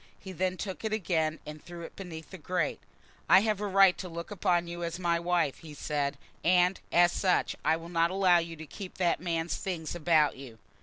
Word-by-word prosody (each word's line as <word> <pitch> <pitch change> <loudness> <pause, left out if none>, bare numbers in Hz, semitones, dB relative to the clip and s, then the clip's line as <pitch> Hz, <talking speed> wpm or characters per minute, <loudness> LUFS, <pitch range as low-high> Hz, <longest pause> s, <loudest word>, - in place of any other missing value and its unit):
He 190 - -9
then 185 +1 -1
took 190 +3 -5
it 220 - -1
again 165 -7 0
and 150 0 -9
threw 175 -1 -9
it - - -10
beneath 165 -5 -9
the 190 - -9
grate. 180 +4 -1 0.5
"I 190 - +8
have 210 -1 0
a 210 - -1
right 195 -1 +6
to 185 - -5
look 170 +2 -7
upon 175 -3 +1
you 170 0 -5
as 170 0 -3
my 170 -2 +1
wife," 170 -4 0
he 155 -3 -11
said, 145 -1 -2 0.3
"and, 180 +1 +3
as 175 0 +5
such, 185 0 +1
I 160 - +3
will 165 0 -9
not 170 -1 +2
allow 185 -2 +4
you 165 0 -5
to 160 0 -9
keep 185 +5 -9
that 175 -2 +1
man's 170 -1 -1
things 175 -6 -4
about 160 -3 +3
you." 130 -4 -10
175 Hz, 215 wpm, -29 LUFS, 165-185 Hz, 0.5 s, I